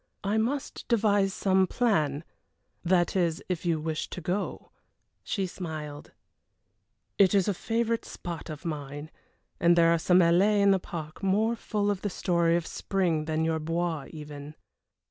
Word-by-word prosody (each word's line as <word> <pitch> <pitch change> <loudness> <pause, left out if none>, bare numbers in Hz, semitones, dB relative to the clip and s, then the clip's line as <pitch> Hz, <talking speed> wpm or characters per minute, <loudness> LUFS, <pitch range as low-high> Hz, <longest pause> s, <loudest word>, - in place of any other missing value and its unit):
"I 205 +2 +1
must 270 +6 -3
devise 205 -4 +3
some 190 -1 +2
plan 155 - +1 0.6
that 175 0 +2
is, 170 -3 0
if 180 -1 -3
you 165 -2 +1
wish 155 0 -3
to - - -6
go." 180 +4 -3 0.5
She 195 -3 -1
smiled. 155 -5 -7 1.1
"It 195 0 +5
is 195 -2 +3
a 205 - +2
favorite 230 +4 -1
spot 170 -1 -7
of 155 0 -8
mine, 145 -1 -5 0.5
and 170 0 +5
there 170 -1 +5
are 170 - +1
some 180 +2 +4
alleés 195 +5 +4
in 200 - +6
the 195 - +3
park 155 -3 -7
more 210 +4 +2
full 205 -2 -1
of 195 -2 -3
the 205 - -1
story 170 -3 +1
of 170 -1 -1
spring 175 -6 -1
than 160 0 0
your 160 0 0
Bois 165 -2 -2
even." 150 -1 -9
175 Hz, 160 wpm, -28 LUFS, 160-200 Hz, 1.1 s, in